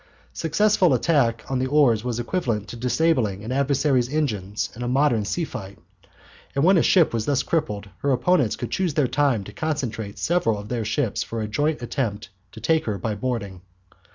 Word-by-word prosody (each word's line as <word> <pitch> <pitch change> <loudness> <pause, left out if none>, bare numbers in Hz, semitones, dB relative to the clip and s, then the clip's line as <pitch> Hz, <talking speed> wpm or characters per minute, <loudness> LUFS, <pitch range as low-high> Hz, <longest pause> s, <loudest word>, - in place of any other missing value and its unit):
Successful 185 +3 +3
attack 130 -9 +1
on 130 -1 -1
the 130 - 0
oars 130 -6 +3
was 120 -1 -2
equivalent 120 - -2
to - - -8
disabling 125 -5 +1
an 115 - -5
adversary's 135 -2 +1
engines 105 -10 -2
in 120 - -9
a 120 - -2
modern 125 -3 +2
sea 135 +12 -2
fight. 100 -7 -8 0.8
And 140 - +1
when 185 +1 +5
a - - +4
ship 170 -5 +4
was 110 -2 -2
thus 140 -2 +1
crippled, 105 -11 -2
her 140 - 0
opponents 130 - +2
could 120 - -6
choose 180 -6 -1
their 150 - +3
own - - -4
time 140 -8 +2
to 105 - -11
concentrate 115 -8 -3
several 160 -11 +1
of 105 +1 -8
their 120 -3 -2
ships 115 +1 -1
for 115 - -4
a 110 - -2
joint 145 +5 -1
attempt 115 -4 -3 0.2
to 110 - -9
take 160 +8 +1
her 105 -3 -2
by 105 +3 -2
boarding. 100 -5 -4
125 Hz, 195 wpm, -23 LUFS, 110-150 Hz, 0.8 s, when